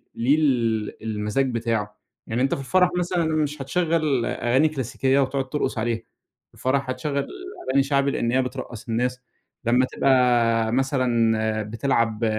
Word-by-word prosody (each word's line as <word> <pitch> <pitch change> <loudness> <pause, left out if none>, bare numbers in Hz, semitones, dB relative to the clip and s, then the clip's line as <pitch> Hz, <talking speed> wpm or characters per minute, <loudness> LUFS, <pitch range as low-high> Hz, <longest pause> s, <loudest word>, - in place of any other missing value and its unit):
ليه 130 +6 +3
ال 115 -9 0
المَزاج 110 +5 -1
بتاعه. 110 -3 -2 0.3
يعني 115 +2 -1
أنتَ 135 - +2
في - - -6
الفَرَح 180 +6 +3
مثلًا 175 -1 0
مش 150 -1 -1
هتشغَّل 155 -4 0
أغاني 130 +6 +2
كلاسيكية 135 -1 0
وتقعُد 135 -1 -1
ترقُص 150 -4 -2
عليها، 115 +1 0 0.5
في - - -66
الفَرَح 135 +1 -1
هتشغَّل 140 +2 -2 0.4
أغاني 135 +1 +3
شعبِي 140 0 +1
لأن 120 -3 -1
هي 130 +1 +3
بترقَّص 125 -3 -6
الناس. 125 +2 -1 0.5
لما 125 +2 +4
تبقى، 120 -4 +2
مثلًا 115 -5 +1
بتلعَب 115 0 0
130 Hz, 140 wpm, -24 LUFS, 115-140 Hz, 0.5 s, لما